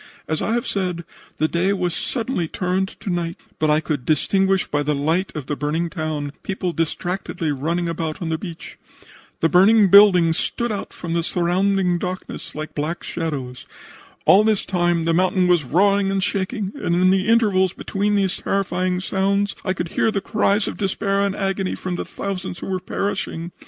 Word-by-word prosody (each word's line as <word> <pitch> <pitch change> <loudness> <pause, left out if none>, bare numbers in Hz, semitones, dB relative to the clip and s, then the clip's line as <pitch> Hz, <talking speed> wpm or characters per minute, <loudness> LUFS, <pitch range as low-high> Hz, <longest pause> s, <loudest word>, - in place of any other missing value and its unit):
As 155 - -1
I 225 - 0
have 240 0 0
said, 180 -4 -2 0.3
the 155 - +2
day 180 +5 +1
was 180 -3 -1
suddenly 230 -7 -2
turned 185 +3 -1
to 195 - -3
night, 170 -1 -2 0.2
but 155 - +2
I 150 +1 +4
could 150 -4 -3
distinguish 190 +6 +2
by 145 - -1
the 150 0 0
light 160 +7 0
of 150 -4 -4
the 145 - -2
burning 160 +4 -2
town 155 -4 -3
people 185 -2 -3
distractedly 170 0 -2
running 165 +5 -1
about 160 -2 -3
on 170 - -3
the 160 -1 -1
beach. 170 -4 -9 0.6
The 165 - +4
burning 195 +4 +6
buildings 180 -5 +7
stood 235 -1 -2
out 205 - -4
from 170 -2 -5
the 170 - +1
surrounding 180 +1 +1
darkness 185 +1 -6
like 155 +1 -6
black 155 +4 -3
shadows. 140 -7 -4 0.6
All 200 +3 +7
this 215 -2 +1
time 175 -3 +1
the 165 - +2
mountain 185 +1 +2
was 175 -3 +3
roaring 195 +7 +3
and 195 -1 0
shaking, 200 +1 -1
and 170 - +1
in 185 +1 +4
the 190 +1 +1
intervals 205 -5 +3
between 205 +1 -1
these 195 -2 +1
terrifying 185 -2 -1
sounds 200 +2 0
I 185 - 0
could 175 -2 -4
hear 225 - +1
the 205 - 0
cries 205 0 +1
of - - -4
despair 195 0 0
and 200 -1 +1
agony 195 -1 -1
from 185 -1 -4
the - - -4
thousands 190 -3 -5
who - - -7
were 190 -1 -1
perishing. 180 -3 -3
180 Hz, 185 wpm, -21 LUFS, 165-195 Hz, 0.6 s, buildings